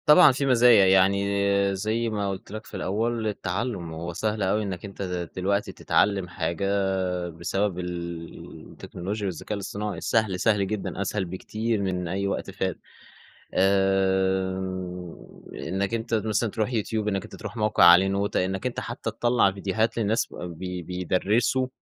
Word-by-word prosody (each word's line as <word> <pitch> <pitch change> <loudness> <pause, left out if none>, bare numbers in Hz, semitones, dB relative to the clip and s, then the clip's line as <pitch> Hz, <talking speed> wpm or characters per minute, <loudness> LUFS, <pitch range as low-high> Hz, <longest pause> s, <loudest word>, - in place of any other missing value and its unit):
طبعًا 150 0 +8
في 140 +2 -1
مزايا. 120 -5 +6
يعني 100 +1 +3
زي 110 +4 -1
ما 105 -2 -1
قُلت 95 0 -6
لك 110 +1 -7
في - - -8
الأول 110 +3 -1
التعلٌم 95 -3 -3
هو 85 +2 -5
سهل 105 +3 -1
أوي 105 +3 +1
إنّك 95 -2 -5
أنت 100 0 -8
د 90 -2 -3
دلوقتي 100 +2 0
تتعلّم 100 -3 +1
حاجة 85 +2 -2 0.6
بسبب 90 +3 -2
ال 85 -2 -7
التكنولوجيا 100 +4 -5
والذكاء 95 +3 -4
الاصطناعي. 100 +1 -4
سهل، 110 -5 +1
سهل 105 -1 +2
جدًا، 100 -1 -3
أسهل 100 0 -1
بكتير 110 +5 -2
من 90 -2 -2
أي 100 +3 -1
وقت 100 - -3
فات. 95 -2 -3 0.7
آآ 95 -1 +2 1.0
إنّك 100 +3 -3
أنت 115 0 -3
مثلًا 110 0 +1
تروح 110 +4 -2
يوتيوب، 110 -1 -1
إنّك 100 -2 0
أنت - - -10
تروح - - -8
موقع 105 -4 +3
عليه 90 +2 +8
نوتة، 100 -1 0
إنّك 95 +3 -4
أنت 125 - -1
حتّى 115 -1 -4
تطلّع 120 -2 +2
فيديوهات 105 +4 -1
للناس 110 0 0
وبب 85 -2 -7
بي 90 0 -5
بيدرّسوا 95 +9 +1
100 Hz, 150 wpm, -26 LUFS, 95-110 Hz, 1.0 s, طبعًا